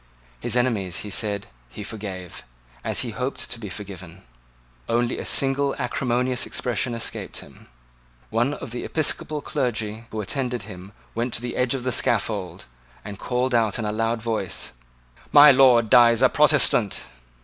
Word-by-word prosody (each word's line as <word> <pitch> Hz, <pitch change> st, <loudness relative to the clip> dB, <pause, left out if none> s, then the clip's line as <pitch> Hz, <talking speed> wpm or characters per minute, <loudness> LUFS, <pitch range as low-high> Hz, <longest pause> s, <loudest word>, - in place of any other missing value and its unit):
His 120 Hz, -, -1 dB
enemies, 105 Hz, -8 st, 0 dB
he 105 Hz, -, -7 dB
said, 100 Hz, -1 st, -2 dB, 0.2 s
he 105 Hz, -, -8 dB
forgave, 100 Hz, -5 st, -7 dB, 0.4 s
as -, -, +1 dB
he 120 Hz, -, -3 dB
hoped 125 Hz, +4 st, -3 dB
to 120 Hz, -, -2 dB
be 105 Hz, -3 st, -7 dB
forgiven. 95 Hz, -2 st, -9 dB, 0.7 s
Only 120 Hz, +1 st, 0 dB
a -, -, -5 dB
single 140 Hz, +1 st, +2 dB
acrimonious 125 Hz, -1 st, -1 dB
expression 120 Hz, 0 st, -1 dB
escaped 115 Hz, -, -4 dB
him. -, -, -12 dB, 0.6 s
One 120 Hz, +6 st, +1 dB
of 115 Hz, -, -8 dB
the 120 Hz, -, -4 dB
episcopal 155 Hz, -1 st, -1 dB
clergymen 115 Hz, -2 st, -2 dB
who 110 Hz, -, -5 dB
attended 125 Hz, +3 st, -2 dB
him 95 Hz, +3 st, -11 dB, 0.2 s
went 120 Hz, +1 st, -1 dB
to -, -, -3 dB
the 120 Hz, -, -4 dB
edge 125 Hz, +1 st, +1 dB
of 130 Hz, -, -4 dB
the 130 Hz, -, 0 dB
scaffold, 105 Hz, -5 st, 0 dB, 0.4 s
and 100 Hz, -1 st, -7 dB
called 125 Hz, +1 st, -1 dB
out 110 Hz, -4 st, +2 dB
in 115 Hz, -, -3 dB
a 105 Hz, -, -1 dB
loud 115 Hz, +1 st, -1 dB
voice, 110 Hz, -5 st, -2 dB, 0.6 s
"My 145 Hz, 0 st, +9 dB
Lord 130 Hz, -4 st, +5 dB
dies 120 Hz, -1 st, +6 dB
a 130 Hz, -, +7 dB
Protestant." 145 Hz, -8 st, +3 dB
115 Hz, 160 wpm, -24 LUFS, 105-125 Hz, 0.7 s, My